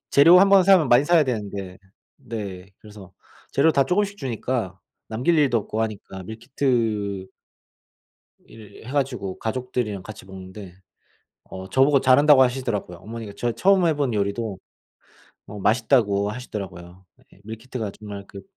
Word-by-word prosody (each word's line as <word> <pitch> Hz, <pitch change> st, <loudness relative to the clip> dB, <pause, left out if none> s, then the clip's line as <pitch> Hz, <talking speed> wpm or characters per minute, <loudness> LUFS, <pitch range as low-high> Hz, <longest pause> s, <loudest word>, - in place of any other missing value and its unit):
재료 170 Hz, +6 st, +7 dB
한번 195 Hz, -1 st, +6 dB
사면 185 Hz, -8 st, +5 dB
많이 125 Hz, +4 st, +5 dB
사야 165 Hz, -2 st, +4 dB
되는데 100 Hz, -6 st, -5 dB, 0.4 s
네. 100 Hz, -7 st, -7 dB
그래서 105 Hz, -4 st, -14 dB, 0.4 s
재료 155 Hz, +4 st, +4 dB
다 140 Hz, -2 st, +2 dB
조금씩 200 Hz, +6 st, 0 dB
주니까 115 Hz, -, -3 dB, 0.3 s
남길 130 Hz, +9 st, +1 dB
일도 130 Hz, -6 st, +3 dB
없고 110 Hz, +2 st, -3 dB
하니까. 100 Hz, -3 st, -6 dB
밀키트 110 Hz, -4 st, -2 dB, 1.2 s
일 110 Hz, -1 st, -14 dB
해가지고 130 Hz, -8 st, -3 dB
가족들이랑 115 Hz, -4 st, -3 dB
같이 110 Hz, -3 st, -11 dB
먹는데 95 Hz, 0 st, -11 dB, 0.7 s
어 95 Hz, 0 st, -10 dB
저보고 135 Hz, +3 st, +3 dB
잘한다고 135 Hz, +1 st, +6 dB
하시더라고요. 120 Hz, -8 st, -1 dB
어머니가 110 Hz, 0 st, -8 dB
저 120 Hz, -, -1 dB
처음 190 Hz, +6 st, +3 dB
해본 145 Hz, -7 st, 0 dB
요리도 100 Hz, 0 st, -2 dB, 0.9 s
어 105 Hz, +1 st, -9 dB
맛있다고 105 Hz, -3 st, +2 dB
하시더라고요. 95 Hz, -6 st, -8 dB, 0.3 s
예. 95 Hz, -, -21 dB
밀키트가 110 Hz, -1 st, -6 dB
정말 100 Hz, -2 st, -9 dB
그 100 Hz, -1 st, -11 dB
115 Hz, 315 characters per minute, -23 LUFS, 100-135 Hz, 1.2 s, 재료